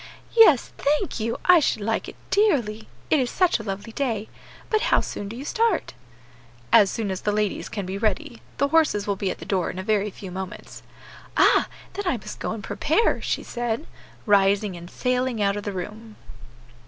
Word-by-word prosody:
"Yes, 385 - +6
thank 300 +4 0
you, 230 +1 -2
I 360 -1 +8
should 220 -8 0
like 225 +2 -1
it - - -11 0.2
dearly, 240 - +2 0.2
it 310 - +5
is 250 -2 0
such 365 -9 +2
a - - -6
lovely 200 +2 -5
day. 225 -4 -2 0.4
But 435 -1 +1
how - - +5
soon 205 - -5
do 225 - -7
you 265 +4 -7
start?" 450 +1 0 0.8
"As 200 - +7
soon 210 -2 -2
as 190 - -4
the 210 - 0
ladies 210 -1 -1
can 200 -3 -4
be 190 +2 -4
ready. 225 +5 -1 0.2
The 280 - +1
horses 305 -10 +3
will 200 - 0
be 195 0 -2
at - - -4
the - - -10
door 185 -3 0
in - - -7
a 185 - -4
very 210 0 +1
few 190 -1 -9
moments." 190 0 -7 0.6
"Ah! - - +5 0.3
then 405 -1 -4
I 270 - +1
must 210 -1 -9
go - - -3
and 220 -2 -5
prepare," 320 - +1
she - - -2
said, 240 +3 -3 0.4
rising 200 -1 +3
and 175 0 -10
sailing 250 0 -1
out 200 -1 +2
of 205 - -3
the 205 - -2
room. 210 +4 -7
220 Hz, 200 wpm, -24 LUFS, 200-280 Hz, 0.8 s, I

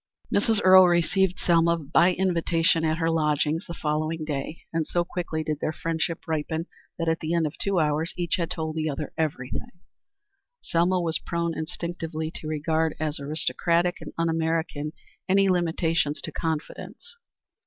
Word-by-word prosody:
Mrs. 215 +1 +3
Earle 185 0 +9
received 180 +2 +2
Selma 170 -1 +3
by 165 +4 +3
invitation 170 -2 +2
at 160 0 +1
her 165 0 +1
lodgings 150 0 +1
the 170 - -6
following 155 +1 -1
day, 150 +1 -4
and 160 -1 0
so 175 - +1
quickly 170 -3 -3
did 150 -1 -2
their 155 - -1
friendship 165 +1 -3
ripen 160 +1 -2 0.3
that 165 - -2
at 165 0 +1
the 160 +1 -1
end 165 -1 +2
of 150 - -3
two 200 -2 0
hours 155 +1 +1
each 175 -1 0
had 170 -2 -1
told 160 -3 -3
the 155 -1 -1
other 145 +1 -4
everything. 140 -5 -3 0.9
Selma 175 +2 +1
was 165 -2 0
prone 170 -1 -2
instinctively 160 -1 -4
to 155 - -7
regard 155 +1 0
as 155 -1 -2
aristocratic 170 +4 0
and - - -7
un 165 0 +1
American 160 -2 -1 0.4
any 195 +1 +4
limitations 165 -4 +1
to - - -5
confidence. 165 - -5
165 Hz, 160 wpm, -26 LUFS, 155-170 Hz, 0.9 s, Earle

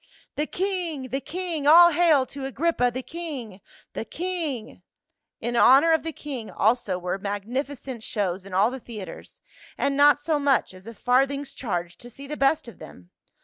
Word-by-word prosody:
" - - -36
The 305 - -1
king! 350 -8 -3
The 270 +4 -1
king! 335 -4 -3
All 345 +3 +9
hail 315 -5 +4
to 275 +1 -8
Agrippa, 270 -1 +1
the 255 +2 -5
king 270 - -7 0.2
— - - -30
the - - -4
king 295 -4 -4 0.3
!" - - -60
In 240 0 -2
honor 275 +7 +6
of 320 - +3
the 325 - -4
king 270 -7 -7
also 215 -3 +1
were 180 +2 -3
magnificent 245 +6 -4
shows 195 -4 -2
in 195 - -12
all 200 +6 +3
the 265 - -6
theaters, 220 -5 -10 0.3
and 275 - 0
not 290 +1 +6
so 300 0 0
much 280 -8 +1
as 185 +3 -14
a 230 - -8
farthing's 270 +4 +1
charge 175 -7 -4
to 240 - -10
see 275 +4 -11
the 300 +2 -5
best 275 -1 +1
of 235 - -12
them. 90 0 -13
265 Hz, 190 wpm, -25 LUFS, 220-300 Hz, 0.3 s, All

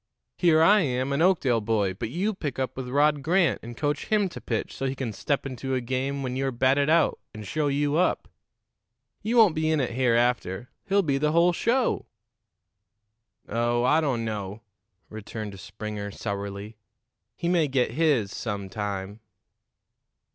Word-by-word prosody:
Here 160 -3 +4
I 205 +5 +6
am, 130 -4 0
an 140 - 0
Oakdale 145 -11 +3
boy, 105 -3 0
but 95 - -5
you 190 - -1
pick 150 -9 -5
up 130 -1 -2
with 130 -1 -5
Rod 145 +2 +3
Grant 170 +4 +2
and 120 +1 -9
coach 145 -1 -1
him 210 -3 +2
to - - -9
pitch - - -3
so 135 - -2
he 135 - -2
can 125 -4 -4
step 140 +7 -1
into 135 0 -3
a - - +1
game 130 +3 -2
when 130 -1 -3
you're 135 +1 0
batted 135 +4 +2
out 165 +1 +3 0.2
and 110 -1 -8
show 150 +8 -1
you 145 +1 +1
up. 180 - +1 0.9
You 225 +3 0
won't 215 -7 +7
be 155 0 0
in 155 -1 +2
it 130 -4 -1
hereafter; 120 -3 +1 0.2
he'll 200 0 +2
be 140 -4 0
the 150 +1 +1
whole 170 +1 +4
show." 240 +7 0 1.4
"Oh, 120 +2 0
I 150 +6 +4
don't 125 -7 -1
know," 105 -1 -5 0.5
returned 105 -2 -7
Springer 105 -1 -6
sourly. 100 +1 -5 0.6
"He 170 - -3
may 170 -3 +3
get 130 -4 +1
his 135 -8 +1
some 100 -4 -4
time." 100 0 -4
130 Hz, 170 wpm, -26 LUFS, 110-155 Hz, 1.4 s, won't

